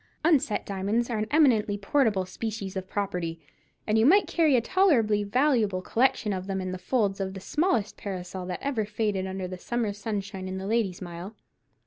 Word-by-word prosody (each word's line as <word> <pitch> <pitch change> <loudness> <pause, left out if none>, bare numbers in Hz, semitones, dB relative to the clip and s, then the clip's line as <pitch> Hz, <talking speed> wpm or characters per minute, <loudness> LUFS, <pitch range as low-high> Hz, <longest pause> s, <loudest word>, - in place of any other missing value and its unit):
Unset 295 -8 +2
diamonds 205 +5 -1
are 220 - -1
an 215 - -1
eminently 235 -9 +3
portable 205 -2 +1
species 200 0 -5
of 190 0 -4
property, 180 -5 -2 0.5
and 220 +1 +2
you 220 - +4
might 400 +6 +6
carry 315 -5 +3
a - - +5
tolerably 235 - +3
valuable 215 -4 +1
collection 230 -3 +1
of 185 0 -4
them 195 -1 -2
in 185 -1 -3
the 185 - -5
folds 205 -2 0
of 190 0 -3
the - - -5
smallest 235 - 0
parasol 185 -2 -5
that 180 - -3
ever 270 -6 0
faded 205 -2 -1
under 190 -1 -4
the 185 0 -7
summer 235 -2 -1
sunshine 200 -2 -4
in 185 0 -4
the 190 - -5
Lady's 200 -4 0
Mile. 175 +4 -8
205 Hz, 185 wpm, -27 LUFS, 190-235 Hz, 0.5 s, might